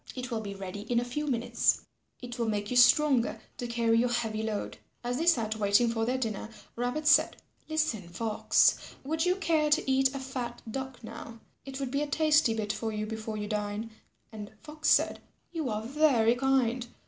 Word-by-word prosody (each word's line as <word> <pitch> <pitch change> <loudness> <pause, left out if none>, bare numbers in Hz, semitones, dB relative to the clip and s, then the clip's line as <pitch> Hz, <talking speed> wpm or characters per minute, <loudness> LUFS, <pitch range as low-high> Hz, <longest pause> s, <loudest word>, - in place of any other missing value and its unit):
It 255 0 -5
will 225 -1 -1
be 200 -2 -6
ready 195 +1 -6
in 240 -1 +3
a 240 - -2
few 295 +5 -3
minutes. 240 -2 +1 0.4
It 245 0 -7
will 230 - 0
make 205 0 -2
you - - -1
stronger 250 0 +4 0.2
to 245 - -4
carry 230 -1 +2
your 245 +1 +2
heavy 225 -2 -1
load." 220 -2 -4 0.2
As 245 +1 -2
they 330 - -1
sat 225 -9 +2
waiting 205 +3 +3
for 225 -1 -1
their 250 +2 0
dinner, 220 -4 -3 0.3
Rabbit 245 +6 -2
said, - - +5 0.3
"Listen, 305 - -1
Fox. 215 +5 +2 0.2
Would 320 +5 -1
you 360 - +3
care 320 -5 +1
to 295 - +2
eat 265 +1 +2
a - - -3
fat 255 -3 -5
Duck 265 -1 -6
now? 230 0 -9 0.3
It 270 0 -7
would 270 -2 -3
be 280 +1 0
a 295 - -1
tasty 300 -5 +3
bit 215 -1 -2
for 220 +1 -3
you 215 0 -3
before 220 0 -5
you 210 0 -4
dine." 210 +1 -3 0.4
And 210 -2 -8
Fox 310 +1 -2
said, - - +3 0.3
"You 320 -6 -3
are 215 0 -2
very 250 -3 +3
kind. 250 -2 +1
240 Hz, 195 wpm, -29 LUFS, 220-270 Hz, 0.4 s, said